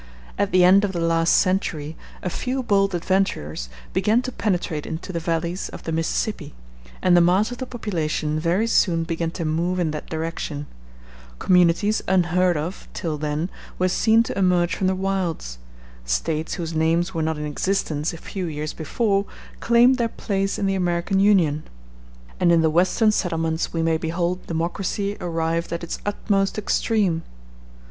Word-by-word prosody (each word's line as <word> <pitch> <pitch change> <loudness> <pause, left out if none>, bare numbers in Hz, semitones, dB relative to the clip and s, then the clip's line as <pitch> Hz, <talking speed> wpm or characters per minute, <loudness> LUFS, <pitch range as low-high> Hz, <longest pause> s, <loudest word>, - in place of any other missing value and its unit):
At 200 0 0
the 185 -1 +5
end 190 +3 +6
of 200 -2 -1
the 175 - -2
last 165 0 +2
century 160 -5 +1 0.3
a 180 - -1
few 260 +6 -2
bold 195 -4 +2
adventurers 165 - -1 0.2
began 225 +4 +2
to 255 - -4
penetrate 175 -9 -2
into 160 +3 -5
the 170 - -1
valleys 170 +2 -2
of - - -10
the 165 - -4
Mississippi, 160 0 -2 0.5
and 180 -1 +5
the 175 - +6
mass 190 +7 +3
of 245 - -7
the 260 - -4
population 160 -9 -2
very 175 +7 +1
soon 175 -7 +2
began 165 0 -2
to 165 0 -5
move 170 +4 0
in 170 -4 0
that 150 - -6
direction: 160 -2 -4 0.7
communities 180 - +3
unheard 180 -1 +2
of 165 +6 -5
till 155 -3 -3
then 150 +4 -2 0.3
were 185 - +2
seen 225 +4 +4
to - - -5
emerge 180 -2 +2
from 190 - 0
the 190 - +1
wilds: 185 - -2 0.4
States 150 - -1
whose 170 -3 -4
names 165 +3 +1
were 165 - -1
not 160 0 -1
in 150 - -4
existence 155 0 -1
a 170 - -8
few 185 +2 -5
years 150 -1 -4
before 200 +5 0 0.3
claimed 240 +2 +4
their 230 -1 +1
place 195 -2 -2
in 200 - -1
the 195 - +1
American 180 +1 0
Union; 180 -7 +3 0.8
and 175 -1 +4
in 170 -1 +5
the 160 - +3
Western 185 +6 +3
settlements 165 -4 -1
we 165 -1 -1
may 165 -1 +2
behold 170 +2 -2
democracy 190 +4 -2
arrived 165 -1 -1
at 170 0 -3
its 170 - -4
utmost 200 -1 0
extreme. 205 -4 +1
175 Hz, 170 wpm, -23 LUFS, 160-195 Hz, 0.8 s, end